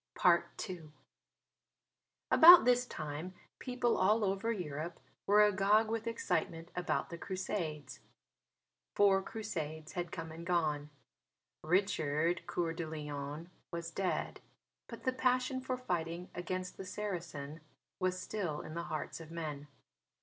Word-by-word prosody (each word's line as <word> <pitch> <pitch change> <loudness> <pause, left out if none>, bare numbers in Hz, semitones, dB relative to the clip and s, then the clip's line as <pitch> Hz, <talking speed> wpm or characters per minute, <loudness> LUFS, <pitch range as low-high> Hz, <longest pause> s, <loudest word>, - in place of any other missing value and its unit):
II 175 -6 +1 1.4
About 345 +2 +10
this 250 0 +4
time 155 +3 -5 0.2
people 250 -2 0
all 210 +3 +4
over 195 +4 0
Europe 165 -4 -4 0.3
were 210 +1 +7
agog 210 +2 +3
with 225 0 -2
excitement 170 -6 -2
about 180 0 -1
the 170 - -6
Crusades. 185 -6 -4 1.0
Four 195 -1 +5
Crusades 160 -8 -5
had 175 -1 -4
come 165 -1 -5
and 165 +1 -8
gone. 155 -4 0 0.7
Richard 170 -2 +1
Coeur 165 -2 -1
de 165 -1 -4
Lion 150 +1 -6 0.2
was 170 -1 -5
dead. 185 +1 -2 0.5
But - - -9
the 255 - +1
passion 255 0 +1
for 255 -1 -2
fighting 175 -6 -3
against 185 +1 -4
the 190 - -6
Saracen 170 -7 -5 0.4
was 185 -1 0
still 185 -7 -3
in 155 - -8
the 170 +1 -4
hearts 155 0 -4
of 165 -1 -10
men. 150 -3 -5
175 Hz, 125 wpm, -34 LUFS, 160-210 Hz, 1.4 s, About